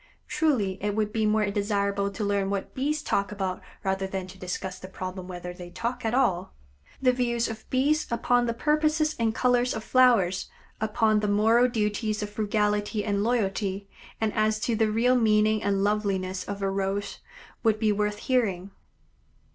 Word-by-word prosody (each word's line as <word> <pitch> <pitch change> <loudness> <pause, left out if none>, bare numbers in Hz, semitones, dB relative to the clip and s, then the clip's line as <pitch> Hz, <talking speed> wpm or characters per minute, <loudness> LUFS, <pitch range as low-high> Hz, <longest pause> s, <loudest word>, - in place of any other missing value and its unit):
Truly 255 -12 +1
it 205 -1 0
would 215 -1 -1
be 220 -1 +1
more 215 0 +2
desirable 200 -1 0
to 200 +2 -5
learn 200 -1 0
what 200 -1 -3
Bees 300 +3 -1
talk 200 0 0
about 190 -3 -3 0.2
rather 190 -1 -1
than 190 -1 -4
to 185 +1 -13
discuss 185 +1 -5
the 185 - -9
problem 185 -1 -6
whether 180 -1 -6
they 175 0 -10
talk 240 +7 -4
at 225 +1 0
all. 185 - +1 0.5
The 255 - +6
views 240 -2 0
of 220 -1 -8
Bees 290 +4 +2
upon 245 +1 +2
the 230 - 0
purposes 305 +3 +1
and 225 -1 +1
colors 245 0 +2
of 220 - -4
flowers, 225 -9 +3 0.3
upon 215 0 +2
the 210 - -1
moral 225 +4 +4
duties 215 -1 -1
of 205 - -5
frugality 210 0 0
and 205 -1 0
loyalty, 200 -4 -1 0.3
and 220 -1 0
as 215 0 +1
to 235 - 0
the 220 0 +2
real 240 +4 +3
meaning 215 -2 +3
and 195 -1 +1
lovliness 195 -3 -1
of 200 0 -5
a 195 - +1
Rose, 195 +1 -2 0.4
would 220 -2 +2
be 215 -1 +2
worth 210 0 0
hearing. 200 -7 0
210 Hz, 175 wpm, -27 LUFS, 195-235 Hz, 0.5 s, The